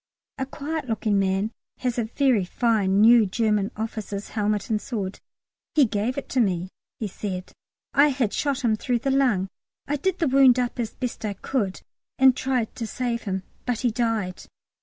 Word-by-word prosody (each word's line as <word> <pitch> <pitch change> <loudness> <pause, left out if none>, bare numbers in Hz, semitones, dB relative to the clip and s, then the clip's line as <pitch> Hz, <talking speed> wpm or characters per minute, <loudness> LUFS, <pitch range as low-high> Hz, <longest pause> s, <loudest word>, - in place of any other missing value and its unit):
A 265 - -2
quiet 290 0 -4
looking 215 -2 +1
little 195 -1 +2
man 200 +3 -1 0.3
has 250 -1 -1
a 230 - 0
very 245 -2 +2
fine 205 -1 +2
new 230 -1 +7
German 210 0 +1
officer's 215 -2 -4
helmet 210 0 -1
and 210 -1 +1
sword. 200 -6 -4 0.6
"He 295 -3 +6
gave 220 +3 -1
it 280 - -4
to 260 - 0
me," 185 -5 +1 0.3
he 220 - -2
said. 185 -1 -5 0.4
"I 285 +1 +6
had 255 -7 0
shot 280 -2 -1
him 220 -2 +3
through 245 +3 0
the 270 +4 -1
lung. 250 -9 +2 0.4
I 295 - 0
did 375 +5 0
the 330 - +1
wound 265 -2 +6
up 250 0 -1
as 230 -2 -3
best 250 -3 -4
I 210 -2 -1
could 200 -1 -2 0.3
and 265 -1 +6
tried 260 -4 -1
to 230 - -3
save 240 0 -2
him, 190 0 -2 0.2
but 245 -2 0
he 245 -2 +2
died. 220 -6 -1
230 Hz, 185 wpm, -25 LUFS, 205-260 Hz, 0.6 s, new